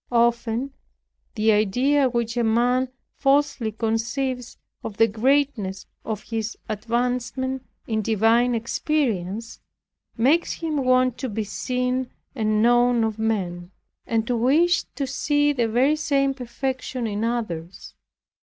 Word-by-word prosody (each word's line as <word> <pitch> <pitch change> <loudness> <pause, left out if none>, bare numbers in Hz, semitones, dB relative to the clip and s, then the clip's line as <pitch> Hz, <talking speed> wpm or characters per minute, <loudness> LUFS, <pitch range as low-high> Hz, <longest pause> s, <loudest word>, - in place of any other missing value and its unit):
Often 235 +2 +1 0.6
the 220 0 +3
idea 255 +7 +3
which 235 -1 -2
a 240 - +1
man 245 +3 +2 0.3
falsely 275 -4 +2
conceives 235 +3 -2 0.3
of 210 -2 -6
the 225 - +6
greatness 225 -4 0 0.2
of 215 -2 -4
his 225 -1 -4
advancement 245 +4 -2 0.2
in 220 -1 -1
divine 225 +3 +3
experience, 230 - -2 0.6
makes 285 +9 +3
him 320 -3 -3
want 255 -2 +2
to 260 - -3
be 220 0 -2
seen 250 +4 -2 0.2
and 215 -3 +1
known 240 0 +4
of 220 -1 -2
men, 180 -6 -2 0.4
and 225 -1 0
to 245 - 0
wish 305 +10 +3
to 280 - -1
see 290 +2 +1
the 240 -4 +1
very 255 +7 +3
same 280 -3 +1
perfection 255 0 -4
in 210 0 -2
others. 195 -8 -4
240 Hz, 125 wpm, -24 LUFS, 220-260 Hz, 0.6 s, the